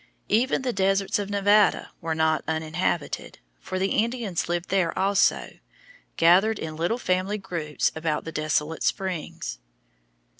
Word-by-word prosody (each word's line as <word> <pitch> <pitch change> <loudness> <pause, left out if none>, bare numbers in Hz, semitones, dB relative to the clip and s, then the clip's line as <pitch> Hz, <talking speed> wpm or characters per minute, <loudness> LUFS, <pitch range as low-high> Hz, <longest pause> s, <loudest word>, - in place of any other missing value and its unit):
Even 255 +5 +2
the 250 -2 -1
deserts 195 +1 +1
of 200 -1 -3
Nevada 205 +1 +3
were 160 -1 -2
not 160 0 +1
uninhabited, 160 0 -2 0.2
for 185 - -5
the 190 +1 0
Indians 225 -7 -1
lived 175 0 -2
there 185 -3 +1
also, 195 +1 +1 0.6
gathered 190 +6 +5
in 155 -4 -5
little 170 +9 0
family 185 -1 0
groups 170 -6 -2
about 160 -1 -1
the 165 - -5
desolate 155 0 -1
springs. 180 - -3
185 Hz, 135 wpm, -25 LUFS, 160-200 Hz, 0.6 s, gathered